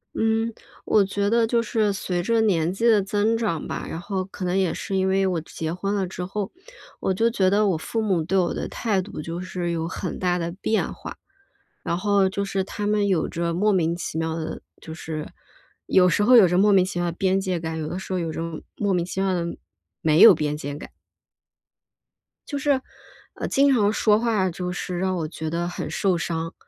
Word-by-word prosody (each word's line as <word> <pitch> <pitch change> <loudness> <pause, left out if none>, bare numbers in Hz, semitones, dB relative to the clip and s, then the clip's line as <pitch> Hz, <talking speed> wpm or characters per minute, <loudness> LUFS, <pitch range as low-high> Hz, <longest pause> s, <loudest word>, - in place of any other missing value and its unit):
嗯， 225 +1 +1 0.3
我 205 -2 +3
觉 200 +1 -1
得 230 0 +3
就 235 0 +1
是 215 -3 +1
随 180 -2 -2
着 225 +5 +2
年 175 -6 +2
纪 230 +5 -2
的 220 -3 +5
增 210 +3 +1
长 205 -9 -2
吧， - - -4
然 160 - -5
后 190 0 -3
可 190 0 -8
能 180 +1 0
也 190 -3 +1
是 195 - -3
因 190 - +1
为 195 0 +2
我 180 -3 0
结 160 0 -5
婚 195 +3 -2
了 195 -2 0
之 180 0 -5
后， 195 +1 -4 0.5
我 190 - 0
就 225 +5 +2
觉 195 -5 +2
得 205 +2 +3
我 175 - +1
父 225 +8 -3
母 190 -6 +1
对 185 +5 0
我 180 -2 +2
的 - - -3
态 210 -5 -1
度 185 -4 -7
就 165 +3 -5
是 180 -1 -3
有 165 -1 -2
很 175 +2 -5
大 180 -1 +1
的 170 -1 -3
变 220 +1 0
化， - - -8 0.7
然 170 - -1
后 200 0 +3
就 200 +1 -2
是 195 -1 -1
他 205 +2 -5
们 210 -1 +2
有 185 -5 +1
着 170 0 -2
莫 205 +5 +2
名 170 -2 +1
其 170 -2 -5
妙 160 0 -1
的 160 -1 -5 0.2
就 160 - -8
是 160 -1 -5 0.6
有 180 -1 +5
时 205 - +2
候 250 +4 +6
有 225 -5 +9
着 175 +1 +1
莫 205 +2 +5
名 190 -2 +6
其 185 -1 -3
妙 175 - 0
的 - - -9
边 190 0 +2
界 185 -2 -1
感， 160 0 -4
有 155 - -3
的 175 - -4
时 190 - -9
候 185 - 0
有 165 -2 -2
着 - - -4 0.3
莫 200 -2 0
名 175 -2 +1
其 185 +1 -3
妙 195 -1 +1
的 175 -2 -1 0.6
没 155 -1 +3
有 225 - +10
边 150 -1 -2
界 145 -1 -5
感。 145 - -10 1.6
就 285 - -3
是 280 -1 +1 0.5
呃， - - -4
经 275 0 +4
常 210 -4 +3
说 215 -1 +3
话 220 -5 +1
就 180 +1 -4
是 180 0 -4
让 185 0 0
我 160 -2 -2
觉 160 0 -5
得 170 +2 -2
很 180 - -5
受 190 -3 +1
伤， 165 -1 -3
190 Hz, 245 characters per minute, -24 LUFS, 170-205 Hz, 1.6 s, 有